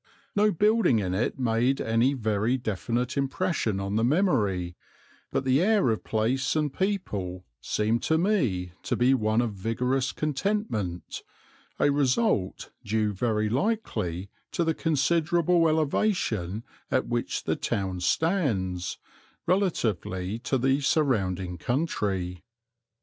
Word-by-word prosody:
No 210 +1 +4
building 210 - +3
in 95 -4 -1
it 105 +6 -1
made 125 +2 +1
any 115 +5 +2
very 110 +1 0
definite 120 +2 -2
impression 135 - 0
on 100 +2 -2
the 110 - +2
memory, 110 - +1 0.6
but - - 0
the 130 +3 +3
air 200 - +3
of 110 - -2
place 125 +6 0
and 150 -3 0
people 105 - -2 0.2
seemed 110 - 0
to 160 - +2
me 130 - +1
to - - -1
be 125 +2 +4
one 110 -2 +2
of 115 -3 -2
vigorous 125 +6 -1
contentment, 150 - -2 0.6
a 145 - +4
result 135 - +1
due 105 0 0
very 110 +1 0
likely 105 - -1 0.2
to 170 - +1
the 160 -1 +1
considerable 165 +2 +2
elevation 140 - 0 0.3
at 130 - +1
which 120 0 -2
the - - 0
town 95 -2 -2
stands, 95 - 0 0.5
relatively 110 - 0
to 135 +2 0
the 135 +2 +2
surrounding 95 - 0
country. 95 - -2
120 Hz, 120 wpm, -27 LUFS, 100-155 Hz, 0.6 s, No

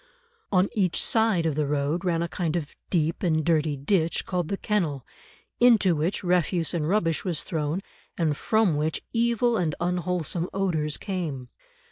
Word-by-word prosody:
On 185 0 +4
each 185 -5 +1
side 220 -7 +2
of 160 - +1
the 150 0 -1
road 145 +4 -1
ran 170 -2 +1
a - - -2
kind 170 -2 -2
of 155 -4 -4
deep 165 -2 0
and 160 -4 +1
dirty 155 -3 +1
ditch 165 +3 0
called 180 -3 -2
the 195 - -2
kennel, 165 - -1 0.5
into 225 -8 +5
which 160 +7 -1
refuse 175 -1 +1
and 160 -2 -1
rubbish 170 -5 +1
was 175 -5 -1
thrown, 155 +2 -2 0.4
and 155 -4 +1
from 215 -3 +2
which 155 +1 -1
evil 235 0 +2
and 165 -6 0
unwholesome 175 -1 -1
odours 160 -6 0
came. 160 - -4
170 Hz, 160 wpm, -26 LUFS, 155-190 Hz, 0.5 s, into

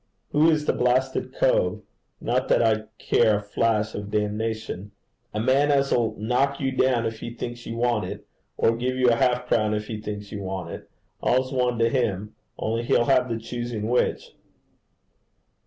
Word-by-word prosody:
'Who 155 +2 +5
is 155 -2 +1
the - - +2
blasted 130 +2 +1
cove? - - +1 0.4
not - - 0
that - - +3
I 110 -1 +2
care 110 -3 +3
a 105 - -6
flash 105 +1 0
of 100 0 -5
damnation.' 105 -1 -2 0.4
'A 105 - -2
man 135 +5 +3
as 140 -1 +2
'll 115 -2 +1
knock 125 +6 0
you 135 -1 0
down 130 -2 +2
if 110 -1 -3
he 115 - -7
thinks 120 0 -6
you 115 - -4
want 120 -2 +1
it, - - -7 0.3
or 115 - +3
give 125 +2 -1
you 125 -1 +4
a - - +4
half 125 -1 +2
a - - -18
crown 110 -3 +2
if 105 0 -3
he 110 -1 -6
thinks 105 -1 -6
you 105 -2 -5
want 95 -1 -4
it - - -9 0.3
all's 130 +2 +1
one 125 -2 +1
to 115 0 +3
him, 110 -5 -1 0.2
only 115 +1 -1
he'll 120 0 +2
have 130 -1 +3
the 115 - -1
choosing 120 -1 -4
which.' 125 - 0
115 Hz, 190 wpm, -25 LUFS, 110-130 Hz, 0.4 s, Who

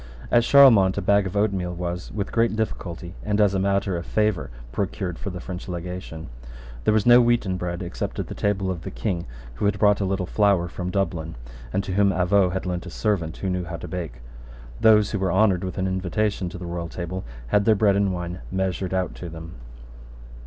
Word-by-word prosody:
At 120 -1 +5
Charlemont 115 -9 +6
a - - 0
bag 100 +1 +3
of 95 +2 -4
oatmeal 95 -4 0
was 90 0 -4
with 100 -2 -3
great 115 -1 +2
difficulty, 90 -5 -4
and 105 0 0
as 105 -2 +4
a 95 - +1
matter 100 -1 +1
of 85 - -3
favour, 105 -3 0 0.2
procured 95 - -3
for 100 - -4
the 90 -1 -6
French 90 +1 -7
legation. 90 -2 -6 0.6
There - - +4
was 110 - +2
no 120 0 +8
wheaten 120 -6 +2
bread, 90 0 -3
except 85 - -4
at - - -2
the - - -7
table 95 -2 0
of 85 -3 -5
the - - -6
King, 90 -6 -3 0.3
who - - -1
had 100 0 +2
brought 105 0 +4
a - - +1
little 95 -1 -1
flour 100 -2 +2
from 90 +1 -5
Dublin, 90 -4 -2 0.4
and 100 - 0
to 95 - -4
whom 100 +1 +4
Avaux 95 0 +3
had 95 +1 -3
lent 90 0 -3
a - - -6
servant 90 -4 -1
who 95 - -3
knew 90 -1 -2
how 85 0 -5
to - - -8
bake. 80 -10 -6 0.6
Those 105 -2 +5
who 105 - -1
were 95 -2 0
honoured 95 -1 +3
with 95 - -5
an 95 - 0
invitation 95 +1 -1
to 90 - -8
the 90 - -7
royal 85 -1 -4
table 90 +2 -5 0.3
had 100 +7 +3
their 110 - +5
bread 100 -1 +3
and 100 -1 +2
wine 90 0 -4
measured 95 0 -1
out 95 -1 -1
to 90 - -6
them. 80 +1 -9
95 Hz, 215 wpm, -24 LUFS, 90-100 Hz, 0.6 s, no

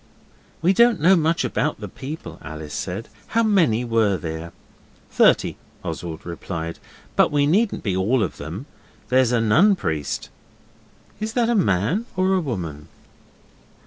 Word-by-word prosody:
'We 185 +3 +5
don't 235 -1 +4
know 180 +6 +6
much 165 0 +1
about 150 - -1
the - - -6
people,' 145 +4 -8
Alice 80 -1 -8
said. 100 +5 -4 0.2
'How 230 +1 +2
many 165 - +3
were 110 -4 +2
there?' 80 -1 -6 0.6
'Thirty,' - - +3 0.3
Oswald 85 -2 -5
replied, 85 -1 -5 0.4
'but - - +4
we 145 -1 +3
needn't 200 +8 +1
be 95 -4 0
all 105 +6 +2
of 90 - -4
them. 85 - -6 0.4
There's 130 -1 +4
a 120 - +3
Nun 160 - +5
Priest.' 80 - -3 0.9
'Is 215 +1 -3
that 235 -1 +2
a 240 - +2
man 170 - +1
or 185 +1 +3
a 190 - +3
woman? 85 - -5
120 Hz, 145 wpm, -22 LUFS, -, 0.9 s, know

